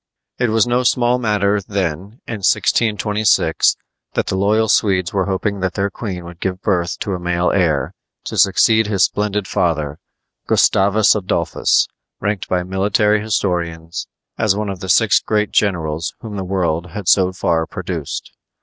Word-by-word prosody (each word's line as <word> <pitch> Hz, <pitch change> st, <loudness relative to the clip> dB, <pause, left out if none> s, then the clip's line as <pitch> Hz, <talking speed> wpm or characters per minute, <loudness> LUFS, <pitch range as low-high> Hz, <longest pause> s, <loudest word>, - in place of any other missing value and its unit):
It 125 Hz, -2 st, +1 dB
was 110 Hz, 0 st, +3 dB
no 120 Hz, +1 st, +1 dB
small 125 Hz, 0 st, +2 dB
matter, 105 Hz, -3 st, +1 dB
then, 95 Hz, -, -4 dB
in 115 Hz, -, -5 dB
1626, 105 Hz, -4 st, +2 dB, 0.4 s
that -, -, 0 dB
the -, -, -2 dB
loyal 105 Hz, +3 st, +2 dB
Swedes 95 Hz, -4 st, +1 dB
were 95 Hz, -1 st, 0 dB
hoping 100 Hz, +1 st, -2 dB
that 95 Hz, -1 st, -2 dB
their 100 Hz, 0 st, -1 dB
queen 95 Hz, -5 st, -6 dB
would 85 Hz, 0 st, -11 dB
give 90 Hz, 0 st, -3 dB
birth 90 Hz, -3 st, 0 dB
to 100 Hz, -, -2 dB
a 90 Hz, -, -3 dB
male 90 Hz, 0 st, 0 dB
heir 80 Hz, -8 st, +1 dB, 0.3 s
to -, -, -6 dB
succeed 110 Hz, +3 st, +4 dB
his 100 Hz, -3 st, +2 dB
splendid 105 Hz, -1 st, 0 dB
father, 75 Hz, -5 st, -1 dB, 0.5 s
Gustavus 100 Hz, +2 st, +4 dB
Adolphus, 90 Hz, -5 st, +1 dB, 0.3 s
ranked 100 Hz, -2 st, -2 dB
by 90 Hz, -1 st, 0 dB
military 100 Hz, +3 st, +1 dB
historians 85 Hz, -6 st, -2 dB, 0.3 s
as 110 Hz, -3 st, +2 dB
one 105 Hz, 0 st, -2 dB
of 95 Hz, -2 st, -5 dB
the 95 Hz, 0 st, -7 dB
six -, -, +4 dB
great 105 Hz, -1 st, -1 dB
generals 85 Hz, -4 st, 0 dB
whom 110 Hz, -3 st, -7 dB
the 95 Hz, -, -3 dB
world 90 Hz, -3 st, -1 dB
had 95 Hz, +2 st, -7 dB
so 95 Hz, -2 st, +4 dB
far 85 Hz, -3 st, 0 dB
produced. 85 Hz, -5 st, -5 dB
95 Hz, 160 wpm, -18 LUFS, 90-105 Hz, 0.5 s, succeed